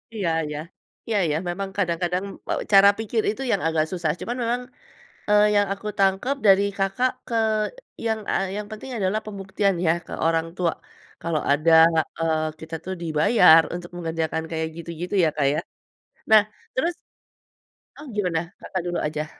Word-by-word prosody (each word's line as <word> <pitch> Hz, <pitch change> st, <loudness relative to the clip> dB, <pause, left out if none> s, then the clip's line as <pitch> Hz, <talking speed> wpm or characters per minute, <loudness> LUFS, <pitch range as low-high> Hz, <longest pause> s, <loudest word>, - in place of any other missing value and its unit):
Iya 195 Hz, -6 st, -1 dB, 0.2 s
iya, 150 Hz, 0 st, -5 dB, 0.5 s
iya 225 Hz, -2 st, 0 dB
iya. 155 Hz, -1 st, 0 dB
Memang 195 Hz, +2 st, -3 dB
kadang-kadang, 180 Hz, 0 st, 0 dB, 0.2 s
eee, -, -, 0 dB
cara 195 Hz, +1 st, +9 dB
pikir 225 Hz, 0 st, 0 dB
itu 220 Hz, +5 st, -3 dB
yang 200 Hz, -, +1 dB
agak 160 Hz, -1 st, +1 dB
susah. 170 Hz, -4 st, 0 dB
Cuman 240 Hz, +2 st, -3 dB
memang, 240 Hz, +2 st, 0 dB, 0.7 s
eee, 210 Hz, 0 st, +6 dB
yang 205 Hz, 0 st, +3 dB
aku 200 Hz, +2 st, -8 dB
tangkap 195 Hz, +8 st, +2 dB
dari 195 Hz, 0 st, +6 dB
Kakak 195 Hz, +7 st, +1 dB, 0.2 s
ke 230 Hz, -, -3 dB, 0.7 s
yang, 220 Hz, -1 st, 0 dB
eee, 195 Hz, -, +1 dB
yang 210 Hz, 0 st, -4 dB
penting 215 Hz, +5 st, -8 dB
adalah 195 Hz, +1 st, 0 dB
pembuktian 195 Hz, -1 st, -1 dB
ya 160 Hz, -, +5 dB
ke -, -, -9 dB
orang 165 Hz, 0 st, +1 dB
tua, 175 Hz, -3 st, +1 dB, 0.5 s
kalau 165 Hz, -3 st, -1 dB
ada, 155 Hz, +3 st, +3 dB, 0.5 s
eee, 155 Hz, -1 st, 0 dB
kita 160 Hz, +1 st, -7 dB
tuh 190 Hz, -, -3 dB
dibayar 165 Hz, +1 st, +6 dB
untuk 175 Hz, 0 st, -8 dB
mengerjakan 160 Hz, -1 st, -2 dB
kayak 160 Hz, 0 st, -1 dB
gitu-gitu 170 Hz, +3 st, -5 dB
ya 160 Hz, -, +4 dB
Kak 140 Hz, -3 st, +2 dB
ya. 155 Hz, -, 0 dB, 0.7 s
Nah 215 Hz, -1 st, +9 dB, 0.3 s
terus 335 Hz, +7 st, +1 dB, 1.0 s
Oh 295 Hz, -, -10 dB
gimana? 175 Hz, -4 st, -2 dB
Kakak 185 Hz, -, -3 dB
dulu 175 Hz, 0 st, -2 dB
aja. 150 Hz, 0 st, -2 dB
180 Hz, 160 wpm, -24 LUFS, 160-205 Hz, 1.0 s, cara